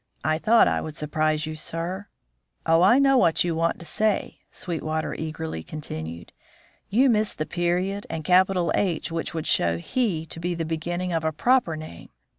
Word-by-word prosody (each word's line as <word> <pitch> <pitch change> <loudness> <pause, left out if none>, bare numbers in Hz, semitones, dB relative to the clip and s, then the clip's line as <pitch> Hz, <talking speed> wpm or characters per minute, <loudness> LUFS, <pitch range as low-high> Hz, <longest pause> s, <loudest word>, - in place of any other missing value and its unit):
I 155 0 +1
thought 230 +5 +5
I - - +1
would 155 -1 -7
surprise 155 0 0
you, 155 0 -5
sir. 170 +5 -4 0.6
Oh, 165 +1 +4
I 200 +8 +6
know 270 -1 +5
what 170 -6 +3
you 175 -1 -1
want 165 +1 0
to 170 - -10
say!" 210 +6 -1
Sweetwater 160 -2 -3
eagerly 160 - -5
continued. 85 - -7 0.6
"You 250 +7 +4
miss 215 -3 +2
the 155 - -2
period 180 +4 -1
and 160 - -4
capital 180 +1 +3
H 175 -4 0
which 165 0 -3
would 160 - -3
show 85 -1 +2
'he' 170 - -1
to 165 - -8
be 175 +1 -2
the 165 -1 -3
beginning 175 +3 -3
of 165 -1 0
a 160 - +1
proper 175 - +2
name. 155 - -10
165 Hz, 180 wpm, -25 LUFS, 155-185 Hz, 0.6 s, I